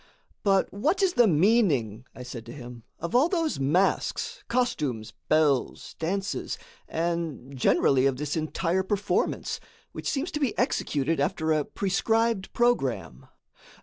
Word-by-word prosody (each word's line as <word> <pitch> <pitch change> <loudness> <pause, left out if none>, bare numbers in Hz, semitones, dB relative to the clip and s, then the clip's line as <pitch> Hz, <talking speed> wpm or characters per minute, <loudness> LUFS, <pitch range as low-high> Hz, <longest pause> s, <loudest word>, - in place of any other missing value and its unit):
"But 195 -2 +2
what 315 - +1
is 370 -2 +3
the 240 -8 +5
meaning," 150 - +2
I 125 - -8
said 125 -2 -7
to - - -7
him, 120 -2 -9 0.2
"of 170 +6 -5
all 265 +7 +4
those 330 - 0
masks, 155 +8 0
costumes, 140 - -1 0.2
bells, 150 -4 +1
dances, 195 +4 -2 0.3
and, 165 -5 -3
generally, 130 +1 +3
of 135 -2 0
this 150 +1 -3
entire 165 +3 0
performance, 200 +1 -1 0.3
which - - -4
seems 300 +5 -2
to 300 - -3
be 275 -6 -1
executed 160 - 0
after 160 0 0
a 155 -1 +2
prescribed 225 +1 0
programme?" 140 - 0
170 Hz, 135 wpm, -27 LUFS, 135-225 Hz, 0.3 s, the